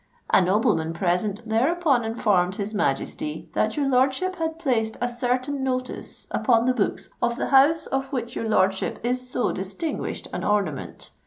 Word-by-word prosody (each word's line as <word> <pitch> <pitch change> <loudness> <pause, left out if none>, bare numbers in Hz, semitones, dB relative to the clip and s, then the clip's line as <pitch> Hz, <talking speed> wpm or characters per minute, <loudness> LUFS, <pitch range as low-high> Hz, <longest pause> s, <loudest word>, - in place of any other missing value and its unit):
A - - +7
nobleman 185 -4 +2
present 195 +5 -1
thereupon 270 +3 +2
informed 200 -5 +1
his 210 0 -4
Majesty 150 -3 -2
that 215 +4 0
your 285 -2 +1
lordship 270 +8 +1
had 320 -1 -2
placed 240 -9 0
a 245 - 0
certain 250 +3 -1
notice 255 -1 -4
upon 235 -3 +3
the 255 - +3
books 215 -6 -2
of 235 0 +1
the - - -2
House 280 +4 +5
of 270 0 -2
which 240 -4 -3
your 225 - -2
lordship 190 -2 +1
is 250 +1 -1
so 245 -3 0
distinguished 200 - -4
an - - -3
ornament. 195 -9 -2
235 Hz, 160 wpm, -24 LUFS, 205-265 Hz, -, A